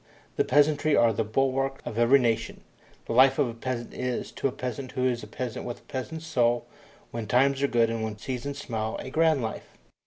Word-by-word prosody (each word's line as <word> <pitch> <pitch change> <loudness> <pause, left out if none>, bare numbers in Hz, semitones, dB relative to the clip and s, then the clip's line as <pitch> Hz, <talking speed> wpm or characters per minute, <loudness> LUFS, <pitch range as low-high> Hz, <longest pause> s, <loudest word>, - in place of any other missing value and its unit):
The - - +3
peasantry 145 +2 +3
are 115 -1 +4
the 115 - 0
bulwarks 135 +4 0
of 115 - -4
every 120 +4 +6
nation. 115 -4 -1 0.4
The - - -3
life 130 +2 +6
of 145 - +3
a 115 - -5
peasant 120 0 -4
is, 125 -1 -3
to - - -1
a - - -2
peasant 125 +1 -5
who 130 - 0
is 120 -2 0
a 105 - -9
peasant 120 +1 -5
with 120 0 -6
a - - -28
peasant's 160 +5 -6
soul, 120 -6 +1 0.5
when 115 -2 -5
times 135 +4 +3
are 140 - +3
good 115 -3 +2
and 115 -1 -2
when 110 -1 -4
seasons 130 +4 -4
smile, 110 -5 -3
a 130 - -7
grand 160 -4 +3
life. 110 - -6
125 Hz, 215 wpm, -27 LUFS, 115-135 Hz, 0.5 s, every